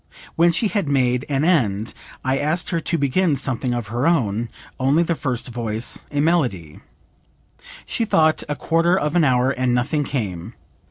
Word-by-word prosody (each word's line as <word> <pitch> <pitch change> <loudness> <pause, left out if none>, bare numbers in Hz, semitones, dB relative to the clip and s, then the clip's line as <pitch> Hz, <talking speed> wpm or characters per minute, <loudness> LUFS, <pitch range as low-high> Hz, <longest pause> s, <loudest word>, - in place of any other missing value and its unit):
When 170 +1 +4
she 215 +6 +1
had 200 -9 -1
made 125 -2 +1
an 140 +1 +1
end 115 - +1 0.3
I 130 +1 +1
asked 155 +4 -1
her 170 - 0
to 165 +1 0
begin 145 +3 +1
something 130 -2 -1
of 120 -3 -3
her 120 +6 0
own, 120 -8 +1 0.3
only 140 +6 +3
the 170 - 0
first 130 -6 -3
voice, 115 -1 -3
a 145 0 -1
melody. 125 - 0 1.1
She 230 - -1
thought 160 -7 +2
a 150 - -1
full - - -15
quarter 170 +2 +3
of 150 -2 -1
an 175 - +4
hour, 130 -1 +3
and 125 -1 0
nothing 145 +5 0
came. 100 -12 -4
135 Hz, 175 wpm, -21 LUFS, 120-165 Hz, 1.1 s, When